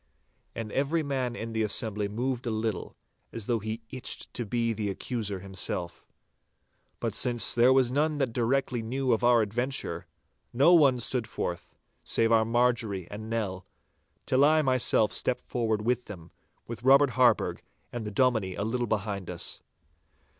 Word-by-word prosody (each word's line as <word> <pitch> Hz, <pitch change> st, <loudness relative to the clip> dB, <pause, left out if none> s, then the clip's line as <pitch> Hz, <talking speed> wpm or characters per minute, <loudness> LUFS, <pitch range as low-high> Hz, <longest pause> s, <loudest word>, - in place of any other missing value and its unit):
And 110 Hz, -2 st, -5 dB
every 150 Hz, +4 st, 0 dB
man 130 Hz, -4 st, -2 dB
in 115 Hz, -1 st, -6 dB
the 110 Hz, -, 0 dB
assembly 105 Hz, -1 st, -1 dB
moved 125 Hz, +4 st, -3 dB
a -, -, +1 dB
little, 110 Hz, -3 st, -3 dB, 0.3 s
as 115 Hz, -3 st, -4 dB
though 115 Hz, 0 st, 0 dB
he 110 Hz, +2 st, -5 dB
itched 130 Hz, -2 st, -3 dB
to 120 Hz, -3 st, -4 dB
be 115 Hz, +1 st, 0 dB
the 105 Hz, -1 st, -3 dB
accuser 100 Hz, -2 st, -3 dB
himself. 95 Hz, -2 st, -4 dB, 0.9 s
But -, -, -2 dB
since 120 Hz, -2 st, +3 dB
there 120 Hz, +2 st, +5 dB
was 130 Hz, -2 st, +3 dB
none 150 Hz, +3 st, +1 dB
that 135 Hz, -5 st, -1 dB
directly 125 Hz, +1 st, 0 dB
knew 130 Hz, +2 st, -1 dB
of 115 Hz, -, -1 dB
our 120 Hz, -2 st, +5 dB
adventure, 120 Hz, +6 st, -3 dB, 0.5 s
no 140 Hz, +9 st, +5 dB
one 140 Hz, -7 st, +5 dB
stood 120 Hz, -1 st, -1 dB
forth 85 Hz, -5 st, -5 dB, 0.3 s
save 115 Hz, 0 st, +1 dB
our 110 Hz, -1 st, +4 dB
Marjorie 115 Hz, -6 st, 0 dB
and 110 Hz, +2 st, -7 dB
Nell, 100 Hz, -5 st, -3 dB, 0.6 s
till 130 Hz, +1 st, +3 dB
I 155 Hz, +1 st, +4 dB
myself 130 Hz, -5 st, +3 dB
stepped 125 Hz, -, -1 dB
forth 110 Hz, -3 st, -1 dB
with 125 Hz, +1 st, 0 dB
them, 85 Hz, -5 st, -11 dB, 0.3 s
with 115 Hz, -2 st, -7 dB
Robert 135 Hz, +1 st, +5 dB
Harburgh 125 Hz, -1 st, +2 dB, 0.3 s
and 120 Hz, -2 st, -4 dB
the 105 Hz, -, -4 dB
Dominie 105 Hz, -4 st, +1 dB
a -, -, -3 dB
little 120 Hz, +3 st, -1 dB
behind 100 Hz, -3 st, -3 dB
us. 90 Hz, -1 st, -2 dB
115 Hz, 160 wpm, -28 LUFS, 110-130 Hz, 0.9 s, there